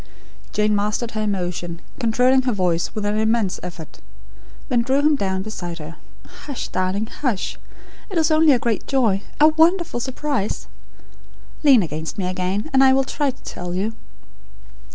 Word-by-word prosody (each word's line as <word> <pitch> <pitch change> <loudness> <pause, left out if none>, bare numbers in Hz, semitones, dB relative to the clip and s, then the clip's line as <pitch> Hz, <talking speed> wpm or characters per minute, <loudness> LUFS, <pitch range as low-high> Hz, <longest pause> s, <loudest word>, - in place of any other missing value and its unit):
Jane 210 0 +2
mastered 210 +3 -1
her 215 - -3
emotion; 175 -4 -3 0.2
controlling 250 +2 +3
her 255 -1 0
voice, 180 -1 0
with 210 -1 -2
an 210 +1 0
immense 220 -3 +1
effort. 170 -3 -9 0.7
Then 245 -3 +2
drew 265 +3 +1
him 300 +1 +4
down 190 -6 -1
beside 175 -5 -6
her. 160 +1 -9 0.3
"Hush, 280 -4 -7
darling, 185 +3 -1
hush! 235 -3 -3 0.5
It 385 - -3
is 320 0 +3
only 310 0 +5
a 260 - +5
great 235 -2 -2
joy 230 -8 +2 0.2
a 305 +1 +7
wonderful 325 -2 +2
surprise. 260 -3 -2 1.0
Lean 270 -8 +6
against 160 0 -5
me 195 - -1
again, 185 +4 -2
and 265 0 +6
I 265 0 +6
will 270 0 +3
try 285 +2 -1
to 260 - -8
tell 175 0 -5
you. 205 +5 -1
215 Hz, 160 wpm, -21 LUFS, 185-265 Hz, 1.0 s, a